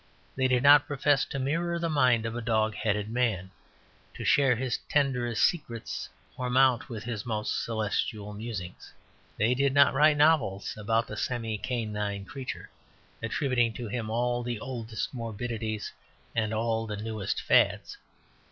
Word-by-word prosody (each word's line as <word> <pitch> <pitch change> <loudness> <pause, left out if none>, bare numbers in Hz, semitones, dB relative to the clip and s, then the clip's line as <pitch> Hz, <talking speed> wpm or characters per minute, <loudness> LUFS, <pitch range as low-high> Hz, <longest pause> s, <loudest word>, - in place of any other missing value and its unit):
They 130 -1 +2
did 125 0 +2
not 145 0 +7
profess 145 0 +2
to - - -5
mirror 165 +6 -1
the 170 0 -1
mind 125 -7 +3
of 115 0 -3
a 120 - -3
dog 110 -1 +1
headed 105 -1 -1
man, 110 -5 -1 0.6
to - - -6
share 135 -3 +4
his 125 0 -2
tenderest 125 -5 +1
secrets, 120 -9 -1 0.3
or 125 -1 -3
mount 130 -1 +3
with 110 -3 -6
his 115 -4 -4
most 110 -2 -2
celestial 105 -1 -2
musings. 105 -4 -7 0.5
They 115 +4 +3
did 140 +1 +1
not 140 -1 +6
write 150 +2 +5
novels 145 -11 +2
about 115 +2 0
the 105 - -8
semi 115 -3 -2
canine 105 -4 -3
creature, 135 +1 -7 0.5
attributing 120 0 +1
to 120 0 -6
him 110 0 -3
all 120 +2 0
the 120 -2 -3
oldest 115 -2 -5
morbidities 115 -2 -4 0.4
and 110 -1 0
all 115 0 -1
the 105 -1 -4
newest 110 -2 -3
fads. - - +2
115 Hz, 150 wpm, -28 LUFS, 110-130 Hz, 0.6 s, not